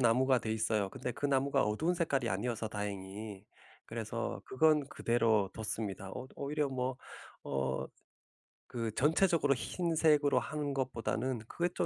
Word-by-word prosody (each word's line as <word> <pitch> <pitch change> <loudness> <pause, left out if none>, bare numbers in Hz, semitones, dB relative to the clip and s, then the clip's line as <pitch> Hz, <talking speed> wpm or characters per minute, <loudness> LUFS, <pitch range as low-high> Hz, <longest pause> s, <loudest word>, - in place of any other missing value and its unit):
나무가 130 +2 +4
돼 110 -1 -4
있어요. 110 -2 +1
근데 125 +2 -4
그 145 - -1
나무가 135 0 +2
어두운 150 +12 +1
색깔이 140 -8 0
아니어서 110 +2 -1
다행히 100 0 -5 0.4
그래서 - - -3
그건 150 0 +3
그대로 115 -6 +2
뒀습니다. 105 -3 -4
어 - - -5
어 - - -10
오히려 145 0 -1
뭐 130 -1 -2 0.5
어 65 -1 -1 0.8
그 115 -2 -3
전체적으로 160 0 +4
흰색으로 155 0 +2
하는 145 -1 -3
것보다는 130 -1 -1
그게 175 +1 0
또 - - +2
125 Hz, 325 characters per minute, -33 LUFS, 110-145 Hz, 0.8 s, 나무가